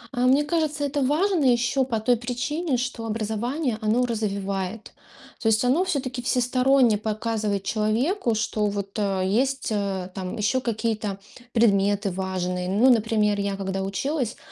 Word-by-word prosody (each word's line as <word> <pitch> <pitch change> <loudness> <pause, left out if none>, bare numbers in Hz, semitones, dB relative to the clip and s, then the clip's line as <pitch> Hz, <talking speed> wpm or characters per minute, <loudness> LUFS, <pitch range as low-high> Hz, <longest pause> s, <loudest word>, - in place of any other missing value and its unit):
А, 245 +1 +2
мне 275 +3 +4
кажется, 305 -1 -1
это 285 +1 -1
важно 320 +5 +2
ещё 245 +2 +3
по 230 -4 -1
той 240 +3 +2
причине, 255 +5 -2
что 245 -2 -3
образование, 225 +4 -2
оно 220 +4 +2
развивает. 200 -2 -3 0.5
То - - -2
есть 220 +2 +2
оно 275 +9 +3
всё-таки 260 -8 -2
всесторонне 250 -1 +3
показывает 215 -2 -2
человеку, 230 - 0
что 215 -1 -1
вот, 200 0 -4
э, 195 -3 0
есть, 260 +7 0
э, 195 -3 -2
там 185 +3 -5
ещё 220 +5 +1
какие-то 220 -4 -2 0.3
предметы 205 -3 +2
важные. 180 -1 -2
Ну 215 +7 +4
например, 215 -3 +2
я, 200 0 -1
когда 195 0 -3
училась, 250 +5 -2
225 Hz, 145 wpm, -24 LUFS, 200-255 Hz, 0.5 s, мне